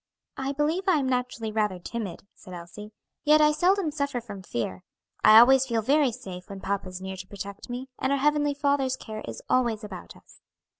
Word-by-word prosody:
"I 270 0 -2
believe 310 +6 0
I 365 -4 +5
am 275 -3 0
naturally 250 -3 -2
rather 210 -3 0
timid," 200 +1 -6
said 185 - -11
Elsie, 175 +5 -10 0.3
"yet 305 0 +5
I 300 0 +5
seldom 360 +1 +2
suffer 280 -4 -2
from 205 -5 -9
fear. 115 - -4 0.4
I 215 0 +9
always 265 +3 +7
feel 230 -3 0
very 280 +2 +3
safe 185 -3 -9
when 195 -1 -7
papa 195 -1 -3
is 185 0 -8
near 190 0 -5
to 185 0 -8
protect 200 +2 -8
me, 250 +2 -5
and 265 - 0
our 280 - +3
Heavenly 290 +1 +2
Father's 280 -2 +1
care 215 -1 -7
is - - -7
always 235 -4 +1
about 190 -4 -9
us." - - -20
240 Hz, 200 wpm, -26 LUFS, 200-280 Hz, 0.4 s, I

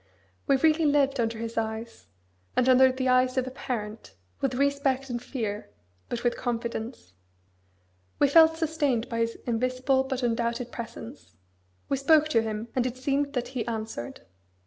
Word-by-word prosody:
We 275 - +5
really 315 +3 +3
lived 280 -2 +2
under 230 -1 0
His 230 0 -3
eyes, 220 - -5 0.5
as 250 - +3
under 260 0 +6
the 260 0 -2
eyes 255 0 +3
of 255 - +2
a 260 - -6
parent, 220 - -5 0.2
with 265 -2 -1
respect 275 -1 +1
and 240 -1 -3
fear, 220 - -4 0.4
but 240 -1 -3
with 240 -1 +1
confidence. 230 - -4 1.0
We 285 - +4
felt 320 +2 +6
sustained 295 -7 0
by 230 -2 -2
His 230 0 0
invisible 255 +3 +1
but 265 -1 -3
undoubted 235 +1 -1
presence. 115 - -9 0.5
We 275 - 0
spoke 310 +3 +4
to 230 -7 +3
Him, 220 +1 -4
and 255 -1 +2
it 250 0 -5
seemed 280 +2 0
that 250 -2 -2
He 250 -3 -3
answered. 220 - -5
250 Hz, 160 wpm, -27 LUFS, 230-270 Hz, 1.0 s, under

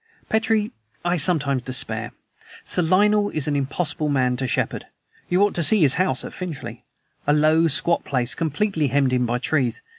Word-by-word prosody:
Petrie, 220 -1 0 0.3
I 175 +1 +1
sometimes 145 -5 +2
despair. 130 0 0 0.5
Sir - - +1
Lionel 205 +4 +2
is 155 -6 -1
an 145 - 0
impossible 150 +2 -2
man 130 -3 +1
to 130 0 -2
shepherd. - - -2 0.4
You 180 +3 +3
ought 205 - +1
to 170 - -1
see 210 +5 +5
his 140 -4 +4
house 185 +4 0
at - - -8
Finchley. 175 -6 -7 0.4
A 145 - +4
low, 155 +2 +3
squat 155 +3 0
place 125 -2 -1
completely 160 - -1
hemmed 135 -1 +1
in 125 -1 +1
by 120 +1 -1
trees. 125 -2 -1
155 Hz, 175 wpm, -22 LUFS, 135-180 Hz, 0.5 s, see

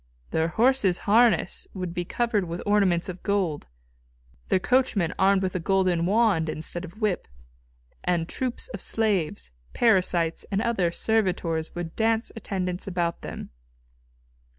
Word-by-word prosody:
Their 160 0 +1
horses' 220 -1 +2
harness 225 +2 +3
would 180 -2 -4
be 175 -1 -3
covered 225 -2 0
with 170 +1 -5
ornaments 200 -4 +2
of 185 -1 -7
gold, 190 - -1 0.8
their - - +4
coachmen 205 -5 +1
armed 195 0 +4
with 185 - -1
a - - 0
golden 180 -1 +1
wand 205 -6 +2
instead 160 +3 -4
of 180 +4 -10
whip, 210 -4 0 0.8
and 175 -2 0
troups 255 +4 -3
of - - -7
slaves, 180 - -1 0.2
parasites 180 -7 +2
and 195 - 0
other 210 -7 +1
servitors 175 -6 0
would 175 -2 -5
dance 225 +1 +1
attendance 185 -4 -3
about 175 -3 -1
them. - - -7
185 Hz, 135 wpm, -26 LUFS, 170-215 Hz, 0.8 s, their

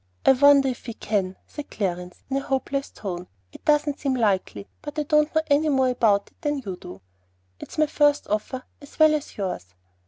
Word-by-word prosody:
"I - - +8
wonder 280 +1 +6
if 255 -1 -4
we 230 - -5
can," 195 -4 -1
said 295 - -8
Clarence, 180 -3 -4
in 270 - -1
a - - 0
hopeless 275 +1 -2
tone. 180 -3 -6 0.3
"It - - -13
doesn't 295 -1 +2
seem 270 -2 0
likely; 200 -4 0
but 295 0 -8
I 300 - +1
don't 300 +1 +2
know 315 - +3
any 300 +1 +3
more 265 -2 +3
about 220 -5 +2
it - - -39
than 295 -2 0
you 190 -2 -4
do. 95 - -11 0.6
It's - - -10
my 310 - +4
first 295 -1 +2
offer 215 +5 -2 0.2
as 285 - -15
well 310 -1 +6
as 300 -1 -3
yours." 180 - -4
265 Hz, 205 wpm, -24 LUFS, 200-295 Hz, 0.6 s, I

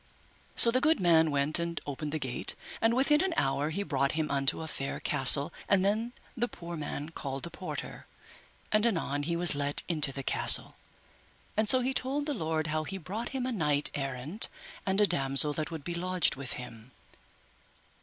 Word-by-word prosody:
So 235 - +8
the 255 +2 0
good 310 -1 +2
man 165 -3 +3
went 145 +2 +2
and 170 -1 -4
opened 145 +1 -6
the 155 - -2
gate, 130 -5 -1 0.3
and 225 +1 +2
within 295 +5 +2
an 375 -3 -2
hour 135 +2 -1
he 195 +6 -4
brought 140 -6 -1
him 155 -2 -2
unto 140 +3 +2
a - - -7
fair 135 -3 -5
castle, 140 +2 +4 0.2
and 195 -1 +2
then 220 +4 -1 0.2
the 240 0 -1
poor 170 -6 -9
man 150 -1 -6
called 135 -4 -7
the 170 - -6
porter, 185 +2 -8 0.6
and 215 0 +2
anon 165 -9 -2
he 170 +4 -3
was 175 -1 +1
let 145 0 +3
into 155 -5 0
the 135 0 -7
castle, - - +6 0.8
and 215 0 0
so 255 - +7
he 260 +2 -2
told 275 +3 -2
the 295 - -3
lord 160 - -3
how 155 0 -2
he 195 +5 -7
brought 200 +7 -6
him 260 -2 -4
a 255 - -2
knight 150 -9 +1
errant 135 - -3 0.4
and 190 +1 +1
a 210 - +5
damosel 140 -2 +3
that 155 +1 -4
would 160 -4 -8
be 175 - -5
lodged 180 +1 0
with 135 -2 -5
him. 115 -1 -10
160 Hz, 195 wpm, -28 LUFS, 145-210 Hz, 0.8 s, So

